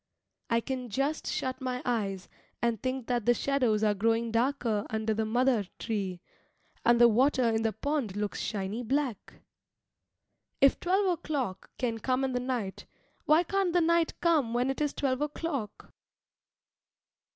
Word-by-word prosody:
I 230 0 +2
can 255 -1 -4
just 275 +8 -1
shut 260 +1 -2
my 255 -1 -2
eyes 200 -6 -1 0.3
and 235 -3 0
think 255 -1 -2
that 240 -3 -1
the 240 - +5
shadows 245 -7 +1
are 210 -1 +4
growing 225 +3 +1
darker 230 -3 +1
under 220 0 -1
the 220 0 -1
madar 240 -2 +2
tree, 195 -6 -3 0.6
and 240 0 +4
the 240 - +8
water 255 +4 +3
in 225 -1 +2
the 225 -1 +1
pond 280 -7 -2
looks 205 0 -2
shiny 205 +2 -3
black. 255 -2 -2 1.3
If 275 - +5
twelve 380 +3 +2
o'clock 295 - -2
can 230 -3 -1
come 255 +3 0
in 265 - 0
the 250 - 0
night, 245 -6 -3 0.4
why 310 +3 +5
can't 385 -1 0
the 355 - +4
night 335 0 +2
come 300 -9 +2
when 250 +2 +2
it 270 - -5
is 295 -1 +1
twelve 265 -1 -1
o'clock? 295 -7 -4
245 Hz, 155 wpm, -29 LUFS, 220-275 Hz, 1.3 s, the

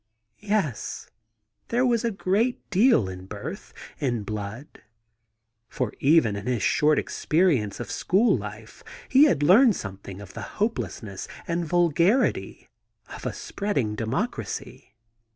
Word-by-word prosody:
Yes, 200 - -2 0.6
there 245 +2 +1
was 240 -2 +2
a 235 - +1
great 210 +4 0
deal 200 - +4
in 95 0 -8
birth, 100 +1 -7 0.3
in 120 -6 -1
blood! 105 +6 -7 0.9
For 125 -5 -3
even 140 -7 +4
in 100 +2 -6
his 125 -4 0
short 150 0 +3
experience 155 - +1
of 120 - -5
school 205 +4 +2
life 105 0 -8 0.3
he 270 +3 +7
had 240 - +2
learned 210 - +6
something 95 -1 -7
of 100 -2 -11
the - - -7 0.2
hopelessness 120 - -3 0.2
and 170 0 -1
vulgarity 175 - +1 0.5
of - - -6
a - - -1
spreading 140 - -2
democracy. 110 +1 -4
150 Hz, 125 wpm, -25 LUFS, -, 0.9 s, he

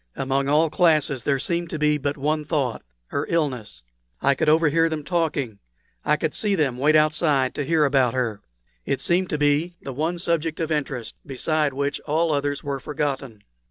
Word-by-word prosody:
Among 135 +1 0
all 155 +2 +3
classes 155 -7 +2
there 140 +1 +1
seemed 170 +4 -2
to 160 - -4
be 150 0 +2
but 145 +1 -2
one 150 +2 0
thought 145 -6 -1 0.3
her 140 - -2
illness. 125 - -2 0.4
I 140 - +3
could 150 +3 +1
overhear 165 +1 +4
them 155 -2 -3
talking 145 - -1 0.4
I 150 - +2
could 155 0 -2
see 205 -2 +1
them 135 -7 0
wait 150 +3 +4
outside 155 -4 +3
to 145 - -2
hear 155 +1 +2
about 135 -4 +2
her. 115 -5 -1 0.4
It 135 - -1
seemed 180 +1 +1
to 150 - -1
be 150 +4 +1
the 135 - -7
one 160 +6 -1
subject 165 -2 -1
of 165 -1 -2
interest, 135 -6 -2
beside 150 +2 0
which 140 +1 -2
all 160 +1 0
others 145 0 -1
were 140 -1 -3
forgotten. 135 -7 -4
150 Hz, 185 wpm, -23 LUFS, 135-160 Hz, 0.4 s, overhear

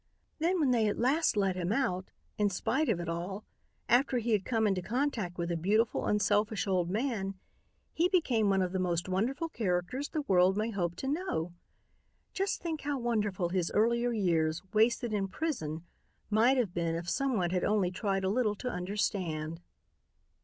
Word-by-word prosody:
Then 345 +3 +1
when 285 -5 +3
they 230 -3 +3
at 205 - -1
last 275 +1 +2
let 195 -2 +2
him 180 0 -2
out, 190 -7 0 0.3
in 205 -1 +3
spite 265 +10 0
of 200 -6 +1
it 170 - -4
all, 175 +5 -4 0.4
after 255 +1 +3
he 235 0 -1
had 205 -3 +2
come 225 -3 +1
into 195 -3 +1
contact 225 -5 -2
with 170 0 -2
a - - 0
beautiful, 210 +7 +1
unselfish 210 +1 +1
old 180 -3 +1
man, 205 -3 -1 0.6
he 345 +3 +2
became 250 - +2
one 195 -1 +3
of 180 - -2
the 190 - -1
most 175 -1 0
wonderful 235 - -1
characters 225 - -2
the 310 -2 -2
world 190 -4 +3
may 220 +2 0
hope 175 -4 -2
to 265 - -5
know. 275 - -2 0.8
Just 390 -2 -1
think 320 -3 -3
how 285 0 -2
wonderful 210 -7 0
his 180 -1 0
earlier 235 +3 +2
years, 170 -7 +1
wasted 225 +1 +2
in 200 -2 0
prison, 175 - -3 0.5
might 235 +5 +4
have 220 -8 0
been 170 -2 -1
if 170 +1 -5
someone 220 -8 0
had 180 -1 0
only 200 -4 +2
tried 195 0 -1
a 190 - +1
little 215 -1 +1
to 250 - -4
understand." 180 -5 -2
205 Hz, 180 wpm, -31 LUFS, 180-245 Hz, 0.8 s, might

